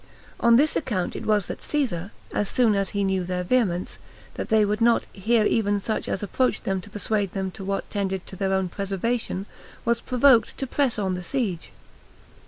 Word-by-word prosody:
On 235 0 +5
this 295 +6 +4
account 210 - -1
it - - -5
was 210 -3 +3
that - - -6
Caesar, 200 - -1 0.2
as 205 - 0
soon 235 -4 +3
as 195 -1 0
he 200 -1 -1
knew 190 -1 +1
their 180 0 -2
vehemence, 185 -4 0 0.3
that - - -5
they 220 -1 +4
would 210 +2 -1
not 235 0 +4
hear 215 +3 +2
even 205 -2 +2
such 215 +2 -2
as 195 - -2
approached 250 +3 0
them 190 -1 -1
to 205 - -12
persuade 205 -2 -1
them 190 -1 -2
to 195 - -9
what 195 +1 -2
tended 190 -2 -2
to - - -9
their 190 +1 -1
own 190 -1 +1
preservation, 195 +2 -2 0.4
was 235 0 +1
provoked 250 -2 +4
to 270 - -2
press 270 -1 +1
on 195 -3 0
the 180 - -3
siege. 200 -5 -2
205 Hz, 195 wpm, -25 LUFS, 190-235 Hz, 0.4 s, On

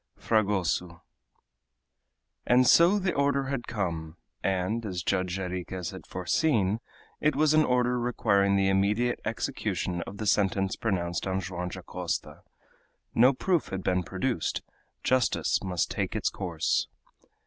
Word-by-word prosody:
FRAGOSO 95 -5 0 1.4
And 125 +1 +5
so 170 +9 +6
the 190 -2 0
order 140 -1 +1
had 135 -4 -3
come, 85 -6 -3 0.2
and, 95 +4 0
as 90 -5 -4
Judge 90 0 0
Jarriquez 90 -1 -4
had - - -10
foreseen, 100 - +1 0.4
it 150 -1 +2
was 155 +1 +3
an 155 0 +5
order 125 -2 +1
requiring 100 -5 +2
the 95 0 +3
immediate 105 +5 +1
execution 85 -1 -2
of 100 - -8
the 110 - -4
sentence 95 -1 +2
pronounced 90 -5 -2
on 95 0 0
Joam 90 -1 -4
Dacosta. 90 -1 -5 0.7
No 125 +3 +6
proof 170 +5 0
had 95 -1 -5
been 90 0 +1
produced; 95 +2 -2 0.4
justice 130 -2 +2
must 90 -3 -1
take - - -2
its - - 0
course. - - -1
100 Hz, 130 wpm, -28 LUFS, 90-125 Hz, 1.4 s, so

